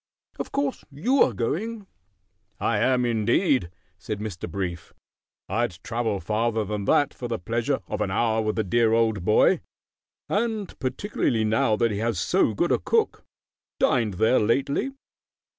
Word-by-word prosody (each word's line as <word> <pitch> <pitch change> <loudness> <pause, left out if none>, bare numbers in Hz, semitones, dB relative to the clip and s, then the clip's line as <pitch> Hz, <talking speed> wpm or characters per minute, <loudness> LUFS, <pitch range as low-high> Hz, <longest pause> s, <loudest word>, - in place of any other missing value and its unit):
Of - - -4
course 280 -1 -1
you 235 - +1
are - - +5
going?" 200 - -3 0.7
"I - - +1
am, 125 -1 +2
indeed," 120 - +2 0.3
said 105 +2 -5
Mr. 105 -5 -5
Brief. 90 -4 -5 0.5
"I'd 110 -2 -1
travel 115 -3 -1
farther 110 +2 0
than 105 0 -3
that 145 +6 +3
for 125 - -6
the 115 -1 -2
pleasure 115 +8 -1
of - - -3
an 105 - 0
hour 110 +3 +1
with 110 -1 -1
the 110 - +1
dear 110 +3 +2
old 110 -4 +2
boy, 105 +3 +4 0.7
and 215 -2 -1
particularly 130 - -1
now 110 0 +2
that 115 +1 +1
he 100 - -2
has 115 -4 -1
so 105 +4 +2
good 175 - +1
a - - +3
cook. 455 -1 0 0.6
Dined 115 - +2
there 110 +6 +3
lately?" 135 - +1
115 Hz, 155 wpm, -25 LUFS, 105-135 Hz, 0.7 s, are